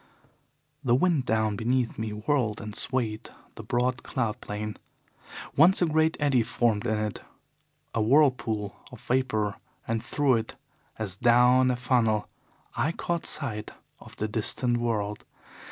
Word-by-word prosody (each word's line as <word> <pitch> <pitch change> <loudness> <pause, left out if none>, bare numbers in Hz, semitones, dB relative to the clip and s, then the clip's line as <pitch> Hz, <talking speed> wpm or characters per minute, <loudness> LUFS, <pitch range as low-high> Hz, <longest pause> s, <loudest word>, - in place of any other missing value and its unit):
"The 120 -3 +3
wind 150 -3 +2
down 110 -1 +1
beneath 120 +2 0
me 110 0 -2
whirled 110 0 0
and 105 -1 -7
swayed 110 -3 -2 0.2
the - - -9
broad 125 +1 0
cloud 115 -2 -2
plain. 105 +1 -5 0.8
Once 170 +6 +6
a 175 - +3
great 160 0 +2
eddy 140 -4 +3
formed 115 -1 0
in 110 -1 +1
it, 105 -1 -3 0.7
a 115 - 0
whirlpool 115 -5 +2
of - - -11
vapour, 110 -6 0 0.3
and 115 0 -1
through 135 0 +2
it, 115 0 -5 0.4
as 100 -4 -3
down 125 +3 +5
a 125 - +1
funnel, 120 -4 +1 0.5
I 160 - 0
caught 170 0 -3
sight 110 -8 -2 0.3
of - - -14
the 110 - -2
distant 120 +3 0
world. 105 -3 -2
120 Hz, 140 wpm, -27 LUFS, 110-130 Hz, 0.8 s, Once